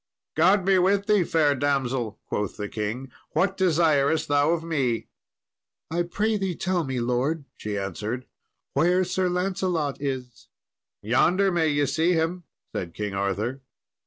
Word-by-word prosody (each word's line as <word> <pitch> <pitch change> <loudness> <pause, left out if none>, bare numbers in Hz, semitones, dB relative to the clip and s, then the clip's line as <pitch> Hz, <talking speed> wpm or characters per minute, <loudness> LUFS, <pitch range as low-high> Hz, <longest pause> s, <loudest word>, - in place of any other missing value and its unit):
"God 185 +4 +4
be 190 -1 +4
with 195 +2 +2
thee, 210 -3 +4
fair 155 -3 +3
damsel," 130 -5 -1
quoth 105 -2 -3
the 105 - -3
king; 110 +5 -4 0.2
"what 190 +4 +2
desirest 160 -5 +2
thou 145 +1 +3
of 165 -1 +1
me?" 135 -8 -1 0.8
"I 170 +1 +1
pray 210 +6 0
thee 190 -3 -2
tell 185 -1 0
me, 135 -3 -2
lord," 130 +6 0
she 105 -1 -4
answered, 105 +6 -4 0.5
"where 175 +6 +3
Sir 185 0 0
Lancelot 180 -6 -1
is." 130 -4 -5 0.6
"Yonder 180 - +3
may 165 -2 +2
ye 145 -1 +2
see 160 +6 +2
him," 165 +1 -1 0.3
said 85 -3 -4
King 105 -2 -3
Arthur. 100 +7 -2
150 Hz, 145 wpm, -25 LUFS, 125-180 Hz, 0.8 s, God